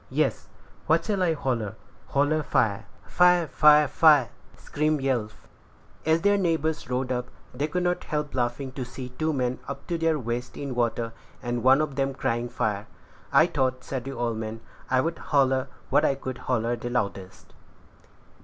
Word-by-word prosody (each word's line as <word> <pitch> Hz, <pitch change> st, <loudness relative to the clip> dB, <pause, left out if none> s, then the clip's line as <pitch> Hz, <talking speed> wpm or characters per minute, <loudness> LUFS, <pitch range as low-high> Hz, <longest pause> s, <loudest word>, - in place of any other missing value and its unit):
"Yes." -, -, 0 dB, 0.4 s
"What -, -, +3 dB
shall 205 Hz, -3 st, 0 dB
I 175 Hz, -3 st, +3 dB
holler?" 120 Hz, -9 st, -2 dB, 0.3 s
"Holler 145 Hz, +3 st, +1 dB
fire." 110 Hz, -7 st, 0 dB, 0.2 s
"Fire! 180 Hz, -1 st, +4 dB
fire! 150 Hz, 0 st, +5 dB
fire!" 145 Hz, -5 st, +5 dB, 0.3 s
screamed 150 Hz, 0 st, -1 dB
Yelf. 120 Hz, -6 st, -2 dB, 0.6 s
As 160 Hz, +1 st, +3 dB
their 205 Hz, +1 st, +3 dB
neighbors 160 Hz, -6 st, -1 dB
rowed 125 Hz, 0 st, -1 dB
up, 125 Hz, 0 st, -2 dB, 0.3 s
they 140 Hz, +4 st, -1 dB
could 180 Hz, +4 st, -2 dB
not 180 Hz, 0 st, -1 dB
help 150 Hz, -1 st, -3 dB
laughing 125 Hz, +2 st, -2 dB
to 130 Hz, 0 st, -5 dB
see 125 Hz, +1 st, -8 dB
two 155 Hz, +5 st, -1 dB
men 125 Hz, -3 st, -1 dB
up 140 Hz, 0 st, -6 dB
to 170 Hz, -1 st, -2 dB
their 165 Hz, -1 st, +2 dB
waists 120 Hz, -1 st, -4 dB
in 140 Hz, -2 st, -4 dB
water, 115 Hz, -1 st, -1 dB, 0.3 s
and 120 Hz, -1 st, -2 dB
one 130 Hz, +4 st, +5 dB
of 145 Hz, -3 st, -3 dB
them 135 Hz, 0 st, 0 dB
crying 120 Hz, -1 st, -1 dB
fire. 105 Hz, -2 st, -2 dB, 0.4 s
"I 140 Hz, +3 st, +6 dB
thought," 130 Hz, -6 st, -1 dB
said 130 Hz, -3 st, -5 dB
the 135 Hz, -, -5 dB
old 115 Hz, -2 st, -2 dB
man, 110 Hz, 0 st, -5 dB, 0.3 s
"I'd 130 Hz, +6 st, +1 dB
holler 135 Hz, -2 st, +2 dB, 0.2 s
what 150 Hz, -, +4 dB
I 140 Hz, -, +2 dB
could 130 Hz, -1 st, -6 dB
holler 120 Hz, -1 st, +1 dB
the 120 Hz, -, -5 dB
loudest." 100 Hz, -6 st, -4 dB
135 Hz, 170 wpm, -26 LUFS, 120-155 Hz, 0.6 s, I